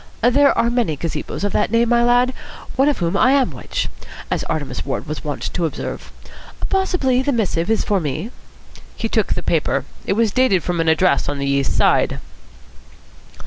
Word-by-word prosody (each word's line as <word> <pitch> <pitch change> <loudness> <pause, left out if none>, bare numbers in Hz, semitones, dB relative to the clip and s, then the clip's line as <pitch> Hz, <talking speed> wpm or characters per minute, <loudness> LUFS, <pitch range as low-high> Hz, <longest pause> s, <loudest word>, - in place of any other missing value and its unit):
"There 280 +4 +4
are 235 - +2
many 235 -10 0
gazebos 165 +5 -4
of 205 - 0
that 210 - +1
name, 230 +1 +2
my 235 0 +4
lad. 245 +1 +3 0.4
One 270 +3 +4
of 290 - 0
whom 170 +1 -1
I 255 +6 +4
am 275 -2 +2
which, - - -3 0.4
as - - 0
Artemus 145 -5 -3
Ward 135 - -3
was 155 +1 -5
wont 145 -3 -4
to 175 - 0
observe. - - -6 0.6
Possibly 360 -10 +1
the 280 - 0
missive 195 -8 0
is 225 - +2
for 200 -2 +1
me." 155 - -4 0.6
He - - -2
took - - 0
the - - -4
paper. - - 0 0.2
It - - +2
was 220 0 +2
dated 245 -8 +2
from 175 -1 -2
an 165 - +2
address 160 -2 +2
on 145 - -2
the 140 - -2
East 140 -1 0
Side. - - +3
210 Hz, 185 wpm, -20 LUFS, 160-250 Hz, 0.6 s, There